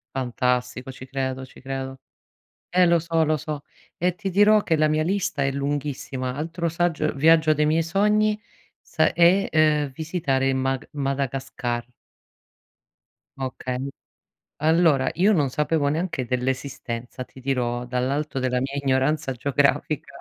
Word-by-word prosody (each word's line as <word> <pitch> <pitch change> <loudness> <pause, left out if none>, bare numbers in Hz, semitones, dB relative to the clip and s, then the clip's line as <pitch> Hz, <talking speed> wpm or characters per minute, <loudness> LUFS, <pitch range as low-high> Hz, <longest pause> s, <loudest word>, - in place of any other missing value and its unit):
Fantastico, 125 0 -1
ci 130 0 -10
credo, 130 0 -3
ci - - -16
credo. 135 0 -5 0.7
Eh 180 +1 +4
lo 170 -1 +4
so, 165 0 +1
lo 155 0 +1
so. 150 +1 -5 0.4
E 180 +1 +1
ti 195 +1 -4
dirò 205 +3 +5
che 165 - +2
la 155 0 +3
mia 155 0 +1
lista 185 -4 -1
è 135 - +1
lunghissima. 140 -2 -3
Altro 165 +3 -3
saggio 165 -2 0
viaggio 160 +2 +5
dei 150 0 +1
miei 160 +2 +3
sogni 210 +4 +2 0.4
sa 160 -2 +1
è, 175 +4 +4
uhm, 150 -2 +3
visitare 140 -4 0
il 135 - +1
Mag 130 0 -1
Madagascar. 135 -3 -2 1.5
Okay, 130 0 -4 0.7
allora 160 -3 +4
io 195 +6 +3
non 145 -7 +2
sapevo 150 +1 0
neanche 160 -3 -2
dell'esistenza, 125 -1 -3
ti 130 - -15
dirò, 125 -2 -1
dall'alto 130 +4 -1
della 125 -1 0
mia 135 +2 -3
ignoranza 135 +1 +1
geografica. 140 +3 0
140 Hz, 135 wpm, -24 LUFS, 130-160 Hz, 1.5 s, dirò